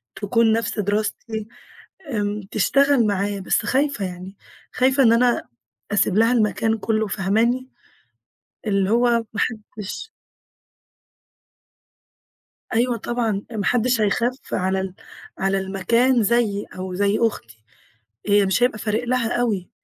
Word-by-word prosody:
تكون 225 +2 +2
نَفْس 225 -1 -1
دراستي، 210 +2 -2 0.6
آمم، 210 -1 -2
تشتغل 275 +2 +3
معايا. 200 0 -1
بس 190 +3 0
خايفة 265 -3 0
يعني، 185 +2 -8 0.4
خايفة 265 +2 +3
إن 230 -2 +6
أنا 240 +1 +2 0.5
أسيب 205 -1 +2
لها 225 +2 +4
المكان 225 -1 +1
كلّه، 220 0 0
فاهماني، 225 +7 0 1.0
اللي 200 -2 +1
هو 240 +2 +3 0.3
ما 210 - -2
حدّش 220 - -4 2.7
أيوه 240 +1 +2
طبعًا، 225 -3 -2
ما 210 -3 -3
حدش 245 +1 +2
هيخاف 240 +5 +1 0.2
على 190 +1 0
ال 190 -1 -5 0.4
على 195 0 +1
المكان 230 +6 +2
زيي 210 -2 +1
أو 185 0 -5
زي 200 +2 +1
أختي، 115 - -2 0.6
هي 205 -1 +4
مش 190 +6 +1
هيبقى 245 -3 +2
فارق 215 +3 -1
لها 245 -1 0
أوي. 205 -7 -1
215 Hz, 120 wpm, -22 LUFS, 200-240 Hz, 2.7 s, إن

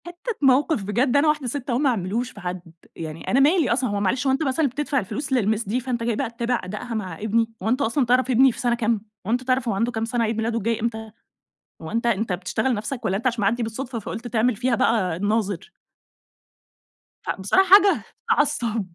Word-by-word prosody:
حتة 350 +7 -5
موقف 270 -2 +3
بجد 240 +7 +1
أنا 290 +2 +3
واحدة 300 -3 +1
ست 270 +2 -4
أهو 240 - +1
ما 280 +1 +2
اعملوش 230 +3 -2
في - - -12
حد، 180 0 -4 0.3
يعني 160 0 -7
أنا 260 - +4
مالي 300 -1 +4
أصلًا، 255 0 0
هو 205 0 -1
معلش 250 +8 0
هو - - +4
أنت 270 - 0
مثلًا 285 +2 +1
بتدفع 280 +2 -1
الفلوس 270 +6 -4
للMiss 220 -3 +1
دي 240 +4 +1
فأنت 245 -2 -3
جاي 230 -1 0
بقى 260 +1 -2
تتابع 235 +1 -2
أدائها 210 +6 -6
مع 185 -7 -4
ابني، 225 +2 +1
هو 220 - 0
أنت 255 +4 +1
أصلًا 255 +2 +1
تعرف 255 +2 +2
ابني 260 +2 +5
في - - -11
سنة 240 -1 +1
كام؟ 230 -2 0 0.3
هو - - -1
أنت 250 +2 +1
تعرف 255 -1 0
هو 225 - +1
عنده 230 +5 0
كام 225 -1 -2
سنة؟ 235 0 -1
عيد 225 0 -1
ميلاده 225 +1 -1
الجاي 230 +1 -1
إمتى؟ 220 -1 -3 0.7
هو 160 - -7
أنت 230 +2 -1
أنت 220 -3 +1
بتشتغل 190 +8 -1
نفسك 230 +4 -4
والّا 190 - +1
أنت 235 +5 -1
عشان 235 -3 -1
معدي 225 +4 +1
بالصدفة 235 +2 -4
فقلت 225 +3 -6
تعمل 235 +1 +1
فيها 250 +3 +1
بقى 210 -7 +1
الناظر؟ 205 -1 -1 1.5
فبصراحة 200 - +2
حاجة 400 +1 +6 0.3
تعصب. 275 - +1
235 Hz, 215 wpm, -23 LUFS, 215-260 Hz, 1.5 s, حاجة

